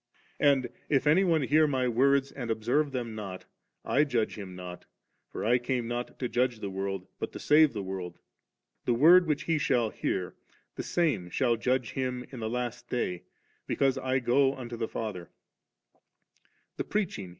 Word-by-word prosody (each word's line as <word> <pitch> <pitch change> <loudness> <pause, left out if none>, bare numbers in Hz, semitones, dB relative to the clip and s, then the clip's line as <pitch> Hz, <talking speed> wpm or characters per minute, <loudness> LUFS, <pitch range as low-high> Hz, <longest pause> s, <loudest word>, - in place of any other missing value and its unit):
And, 140 -3 +3 0.2
if 140 -1 +2
any 160 +6 +5
one 165 -5 +2
hear 155 +4 +4
My 130 -3 0
words 135 +3 +3
and 120 -4 -6
observe 120 +7 +1
them 120 -4 -3
not, 100 -4 -7 0.4
I 145 - +3
judge 120 -7 0
him 95 -3 -8
not; 90 -1 -8 0.4
for - - -5
I 120 +3 +4
came 120 -1 -2
not 120 +1 -4
to 125 - -2
judge 125 -1 0
the 100 -2 -4
world, 95 -1 -3
but - - -3
to - - -7
save 155 0 +5
the 105 -3 -4
world 95 -2 -5 0.7
The 120 - +2
word 170 +7 +7
which 150 -2 0
he 165 -2 +1
shall 120 -6 +1
hear, 90 -2 -2 0.4
the - - -5
same 135 - 0
shall 120 +4 +2
judge 125 +1 0
him 125 -2 -3
in 130 - -7
the 110 -1 -3
last 120 0 -4
day, 90 -8 -2 0.4
because 135 -1 +1
I 130 0 0
go 135 +2 +3
unto 120 -2 -7
the 115 -1 -2
Father 105 -7 -5 0.7
»•' - - -35 0.8
The - - -1
preaching. 180 - -2
125 Hz, 180 wpm, -29 LUFS, 110-140 Hz, 0.8 s, word